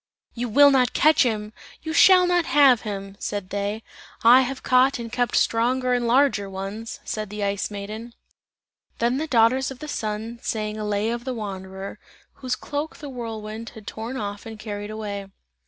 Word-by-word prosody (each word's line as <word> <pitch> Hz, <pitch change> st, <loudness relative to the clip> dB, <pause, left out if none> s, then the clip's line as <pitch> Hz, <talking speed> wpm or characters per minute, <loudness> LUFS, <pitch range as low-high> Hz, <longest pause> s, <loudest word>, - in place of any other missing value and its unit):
"You 240 Hz, 0 st, -3 dB
will 285 Hz, +5 st, +7 dB
not 255 Hz, -3 st, +3 dB
catch 310 Hz, 0 st, +4 dB
him! 215 Hz, -4 st, 0 dB, 0.3 s
You 315 Hz, 0 st, -4 dB
shall 365 Hz, +2 st, +7 dB
not 355 Hz, -1 st, +2 dB
have 270 Hz, -4 st, +5 dB
him!" 195 Hz, -2 st, -6 dB
said 205 Hz, -2 st, -4 dB
they. 205 Hz, +2 st, -2 dB, 0.4 s
"I 245 Hz, +3 st, +8 dB
have 260 Hz, +1 st, -4 dB
caught 255 Hz, +2 st, +4 dB
and 230 Hz, -1 st, -7 dB
kept 245 Hz, 0 st, 0 dB
stronger 250 Hz, +2 st, +2 dB
and 245 Hz, -1 st, 0 dB
larger 240 Hz, -5 st, +3 dB
ones!" 195 Hz, +4 st, -6 dB
said 215 Hz, -2 st, -4 dB
the 210 Hz, 0 st, -4 dB
Ice 200 Hz, 0 st, -1 dB
Maiden. 215 Hz, +3 st, -7 dB, 0.8 s
Then 240 Hz, +2 st, +1 dB
the 315 Hz, +3 st, -2 dB
daughters 250 Hz, +1 st, +3 dB
of 265 Hz, -, -8 dB
the 305 Hz, -, -8 dB
Sun 220 Hz, -2 st, -4 dB
sang 215 Hz, -1 st, -3 dB
a 210 Hz, -, -3 dB
lay 210 Hz, +2 st, 0 dB
of 235 Hz, 0 st, -4 dB
the 260 Hz, -1 st, -4 dB
wanderer, 195 Hz, -1 st, -6 dB, 0.4 s
whose 255 Hz, -1 st, -1 dB
cloak 290 Hz, +4 st, -5 dB
the 290 Hz, -, -8 dB
whirlwind 225 Hz, -3 st, -6 dB
had 220 Hz, -2 st, -11 dB
torn 225 Hz, +5 st, -5 dB
off 205 Hz, -1 st, -5 dB
and 220 Hz, -1 st, -8 dB
carried 205 Hz, -1 st, -6 dB
away. 205 Hz, -2 st, -5 dB
225 Hz, 180 wpm, -24 LUFS, 210-255 Hz, 0.8 s, I